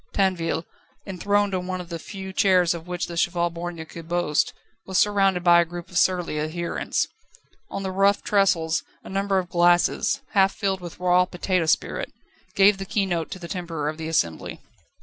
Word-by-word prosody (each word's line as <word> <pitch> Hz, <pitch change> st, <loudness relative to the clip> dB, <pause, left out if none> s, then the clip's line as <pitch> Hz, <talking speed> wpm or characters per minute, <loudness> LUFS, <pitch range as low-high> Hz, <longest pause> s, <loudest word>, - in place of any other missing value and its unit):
Tinville, 180 Hz, -4 st, 0 dB, 0.4 s
enthroned 200 Hz, +1 st, 0 dB
on 180 Hz, -1 st, -2 dB
one 185 Hz, 0 st, -3 dB
of 175 Hz, -1 st, -8 dB
the 170 Hz, -1 st, -5 dB
few 190 Hz, +1 st, -8 dB
chairs 185 Hz, -4 st, +4 dB
of 170 Hz, 0 st, -8 dB
which 180 Hz, -1 st, -2 dB
the 170 Hz, -, -7 dB
Cheval 175 Hz, 0 st, +1 dB
Borgne 170 Hz, -1 st, -6 dB
could 165 Hz, 0 st, -11 dB
boast, 175 Hz, -4 st, +1 dB, 0.3 s
was 190 Hz, -1 st, -2 dB
surrounded 195 Hz, -3 st, +3 dB
by 175 Hz, -1 st, +7 dB
a -, -, +3 dB
group 175 Hz, +1 st, -9 dB
of 175 Hz, -, -3 dB
surly 180 Hz, -4 st, +1 dB
adherents. 170 Hz, +3 st, -2 dB, 0.6 s
On 195 Hz, -, -4 dB
the 190 Hz, -, -2 dB
rough 195 Hz, +2 st, +2 dB
trestles 175 Hz, -5 st, +2 dB, 0.2 s
a -, -, -10 dB
number 195 Hz, 0 st, 0 dB
of 185 Hz, -1 st, -1 dB
glasses, 175 Hz, +9 st, +3 dB
half 195 Hz, -1 st, +3 dB
filled 195 Hz, -3 st, -1 dB
with 175 Hz, -1 st, -9 dB
raw 180 Hz, 0 st, +4 dB
potato 180 Hz, -1 st, -1 dB
spirit, 160 Hz, -, 0 dB, 0.4 s
gave 195 Hz, 0 st, +5 dB
the 195 Hz, -, -4 dB
keynote 185 Hz, -5 st, -1 dB
to -, -, -6 dB
the 175 Hz, -2 st, -8 dB
temper 165 Hz, -5 st, -4 dB
of 155 Hz, +1 st, -3 dB
the 160 Hz, -, -4 dB
assembly. 85 Hz, -, -1 dB
180 Hz, 185 wpm, -24 LUFS, 170-195 Hz, 0.6 s, by